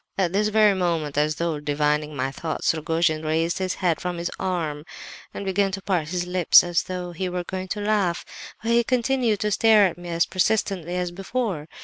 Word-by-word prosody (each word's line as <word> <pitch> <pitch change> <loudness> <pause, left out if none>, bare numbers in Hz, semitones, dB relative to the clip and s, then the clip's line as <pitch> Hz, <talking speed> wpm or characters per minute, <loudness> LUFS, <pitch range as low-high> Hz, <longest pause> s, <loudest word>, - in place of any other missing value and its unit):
"At 185 -2 0
this 210 +2 +2
very 215 -1 +4
moment, 170 -6 -1
as 150 +1 +1
though 165 -3 -2
divining 150 +1 0
my 135 0 -2
thoughts, 160 +4 -1
Rogojin 160 0 0
raised 160 +3 0
his 185 -1 -1
head 175 -4 0
from 180 -1 -3
his 170 0 -3
arm 165 -6 -2 0.5
and 200 - -6
began 195 +1 +1
to 195 - -4
part 175 -6 0
his 175 +1 -2
lips 180 -2 +5
as 175 -1 0
though 180 -1 -5
he 180 +2 -3
were 180 0 -3
going 185 +1 -5
to 205 +3 -4
laugh—but 205 +2 -2
he 235 0 +4
continued 245 -3 +1
to 210 - 0
stare 215 0 +5
at 175 -2 -2
me 175 0 -8
as 170 0 +1
persistently 185 -2 0
as 180 -1 -2
before. 195 -4 -3
180 Hz, 200 wpm, -24 LUFS, 160-195 Hz, 0.5 s, lips